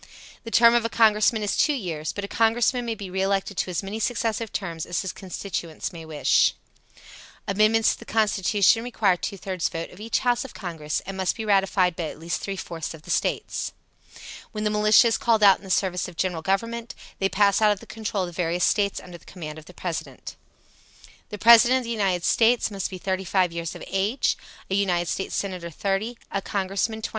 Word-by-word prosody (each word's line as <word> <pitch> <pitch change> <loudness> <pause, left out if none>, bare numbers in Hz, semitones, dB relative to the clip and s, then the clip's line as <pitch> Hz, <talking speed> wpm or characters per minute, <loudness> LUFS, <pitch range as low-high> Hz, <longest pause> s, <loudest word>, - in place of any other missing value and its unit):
The 230 - -7
term 235 0 +6
of 240 -1 +3
a 230 - -1
Congressman 220 -1 +3
is 205 - 0
two 300 - +3
years, 165 - -4
but 205 - -6
a - - -3
Congressman 235 +3 +1
may 230 -1 -2
be 195 -3 -8
re 190 +1 -1
elected 195 +1 0
to - - -1
as 180 +2 -2
many 200 +3 -5
successive 225 -1 -1
terms 165 -5 -4
as 175 +1 -2
his 190 - -4
constituents 180 -3 -5
may 165 -1 -9
wish. 155 -2 +2 0.9
Amendments 215 +2 +3
to - - -11
the - - -11
Constitution 210 0 +2
requires 210 -7 +1
two 200 - -4
thirds 185 -2 -2
vote 165 0 -5
of 180 - -14
each 225 +2 -1
house 245 -1 +1
of 265 - -11
Congress 160 -6 -4
and 195 +1 -6
must 190 -1 0
be 225 - -5
ratified 195 -3 +2
by 170 - -3
at 155 - -7
least 165 +2 -3
three 195 - -4
fourths 165 -3 -6
of 155 - -16
the - - -6
States. - - -1 0.8
When 210 -1 -4
the 210 - +1
militia 215 +3 +5
is 225 - +1
called 225 -3 +2
out 195 -2 +7
in - - -21
the 190 - -10
service 185 -1 0
of 180 - -11
the - - -17
General 180 -3 -2
Government, 230 +6 -2 0.2
they 195 - +1
pass 200 +1 +3
out 215 -1 +5
of 205 - -1
the 230 - -13
control 215 -2 -3
of 180 - -4
the - - -12
various 175 0 -1
States 200 -2 +2
under 175 -1 -11
the - - -23
command 155 -4 -8
of 155 - -15
the - - -13
President. 170 -3 -6 0.9
The 210 - -6
President 235 +4 +7
of 260 - -3
the 235 - -5
United 195 -6 0
States 230 +2 +3
must 195 -2 -3
be 185 - -7
35 185 -1 0
years 170 -1 -4
of - - -9
age: 200 +7 0 0.3
a - - -4
United 180 -4 +1
States 195 - -3
Senator, 185 -4 -3
30; 200 +7 -2
a 195 - -1
Congressman, 200 +3 -2
25. - - -2
195 Hz, 220 wpm, -24 LUFS, 180-220 Hz, 0.9 s, out